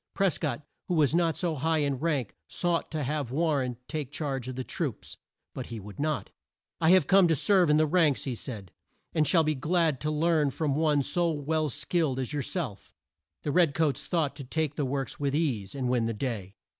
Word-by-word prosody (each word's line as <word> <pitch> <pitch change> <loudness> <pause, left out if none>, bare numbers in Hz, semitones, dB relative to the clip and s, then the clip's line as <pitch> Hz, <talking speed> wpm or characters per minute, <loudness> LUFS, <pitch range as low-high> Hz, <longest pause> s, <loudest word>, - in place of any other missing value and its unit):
Pres 195 -4 +2
cott, 155 -2 -2 0.2
who 180 - 0
was 150 -3 +3
not 170 -1 +2
so 175 -3 0
high 160 +3 0
in 140 -3 0
rank, 145 -8 -1
sought 175 -1 0
to 155 -2 -3
have 145 -1 -2
War 155 +2 +1
ren 125 -2 -3
take 150 -4 -4
charge 140 -4 -3
of 130 - -5
the 130 - -3
troops. - - -4 0.4
But - - -6
he 115 - -6
would 100 -1 -11
not. 155 0 -1 0.5
"I 160 - +3
have 185 -4 +6
come 190 +1 +6
to 165 - +3
serve 185 +2 +3
in 150 - +5
the 155 - +4
ranks," 155 -3 +3
he 130 - -2
said, 110 -7 -7 0.4
"and 155 -2 +2
shall 165 +3 +4
be 155 0 +1
glad 155 -1 +1
to 150 - -1
learn 155 -1 +2
from 145 +1 -1
one 150 -1 +2
so 170 +5 +1
well 155 0 0
skilled 155 -1 0
as 130 +2 -3
your 145 - -1
self." 140 - -4 0.5
The 145 - -1
red 165 -3 +3
coats 155 -3 0
thought 155 -5 0
to 140 - -6
take 150 +3 -1
the 145 -1 -1
works 135 0 -3
with 140 -1 0
ease, 125 - -1
and 130 -2 -2
win 120 -2 +1
the 115 - -2
day. 105 -5 -4
150 Hz, 220 wpm, -28 LUFS, 130-160 Hz, 0.5 s, have